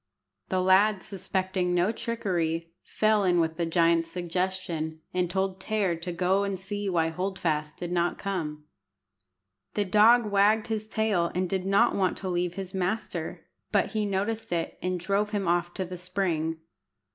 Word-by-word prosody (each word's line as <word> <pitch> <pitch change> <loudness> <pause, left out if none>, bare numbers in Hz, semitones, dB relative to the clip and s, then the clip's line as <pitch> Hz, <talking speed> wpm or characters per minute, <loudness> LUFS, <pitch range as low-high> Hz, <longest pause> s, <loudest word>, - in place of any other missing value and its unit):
The 185 -1 +1
lad, 190 +2 +4
suspecting 190 -2 -1
no 180 +4 +3
trickery, 170 -8 -2
fell 215 -1 +2
in 180 -2 +3
with 160 -1 0
the 170 -1 0
giant's 165 0 +3
suggestion, 175 -2 -2
and 180 -1 +1
told 190 0 -1
Tear 200 -3 0
to 170 +2 -5
go 185 +3 +1
and 200 -1 -2
see 205 +2 -4
why 165 -3 +2
Hold 190 +4 -3
fast 150 -3 -1
did 175 -1 -5
not 175 0 +1
come. 160 -7 -3 1.1
The 205 - +1
dog 220 +5 +6
wagged 210 +2 +4
his 215 -1 -2
tail 210 -6 +1
and 185 0 +1
did 190 +1 -2
not 200 +5 +4
want 190 -2 +1
to 190 - -4
leave 175 0 -1
his 190 -2 -6
master, 190 +4 -3 0.3
but - - +2
he 215 -2 0
noticed 205 +3 -2
it, 170 -1 -2
and 180 0 -1
drove 200 +4 0
him 205 -3 -2
off 175 0 +1
to 190 - -2
the 180 +1 -7
spring. 170 -3 -1
185 Hz, 170 wpm, -27 LUFS, 170-200 Hz, 1.1 s, dog